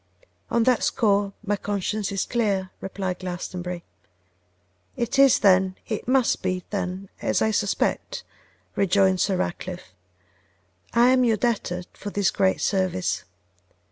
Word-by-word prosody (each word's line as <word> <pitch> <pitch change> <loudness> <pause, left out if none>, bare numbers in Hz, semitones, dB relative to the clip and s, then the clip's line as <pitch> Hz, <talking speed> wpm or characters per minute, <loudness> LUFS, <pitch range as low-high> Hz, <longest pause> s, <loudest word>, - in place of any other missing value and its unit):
'On 235 - +2
that 250 -1 +3
score 200 -2 +2
my 205 0 +1
conscience 205 +1 -2
is 195 -2 -1
clear,' 200 -6 0
replied 190 -2 -4
Glastonbury. 180 -1 -5 1.1
'It 240 +3 -1
is, 275 -2 +7
then, 190 -1 +4
it 215 0 -4
must 255 -1 +2
be 185 -1 -1
then 190 -1 -3
as - - +1
I 220 - +2
suspect,' 205 -2 -1 0.5
rejoined 190 -1 +3
Sir 190 -3 +1
Ratcliffe. 180 - -4 1.0
'I 240 +1 +6
am 255 0 +4
your 225 -3 +3
debtor 200 -6 -1
for 205 - -7
this 200 -2 +1
great 190 -1 +1
service. 185 - 0
195 Hz, 130 wpm, -24 LUFS, 185-220 Hz, 1.1 s, is